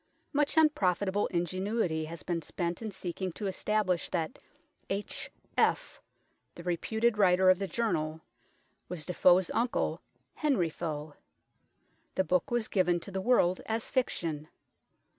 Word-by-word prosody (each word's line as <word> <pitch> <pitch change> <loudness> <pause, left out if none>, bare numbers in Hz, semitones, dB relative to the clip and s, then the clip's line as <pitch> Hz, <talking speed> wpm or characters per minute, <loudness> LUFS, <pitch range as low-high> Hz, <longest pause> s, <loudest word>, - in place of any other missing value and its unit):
Much 290 +2 +1
unprofitable 205 - +3
ingenuity 180 -1 -1
has 165 +1 -8
been 170 -2 -1
spent 170 +4 -3
in 220 - -3
seeking 185 -1 -4
to 205 - -6
establish 195 -2 0
that 165 -3 -2 0.3
" - - -42 0.2
H.F.," 200 +1 -1 0.5
the 170 - -9
reputed 220 +6 0
writer 185 -1 +6
of 185 - +2
the 195 - -2
Journal, 160 -9 -1 0.7
was 170 -4 -4
Defoe's 180 0 +4
uncle, 240 +1 0 0.3
Henry 255 - +1
Foe. 150 -2 -4 1.0
The 190 - +3
book 180 -1 +1
was 240 -2 0
given 180 -3 +2
to 195 - -9
the 190 0 -2
world 190 -5 +3
as 225 0 -2
fiction. 165 - -1
185 Hz, 130 wpm, -30 LUFS, 170-215 Hz, 1.0 s, writer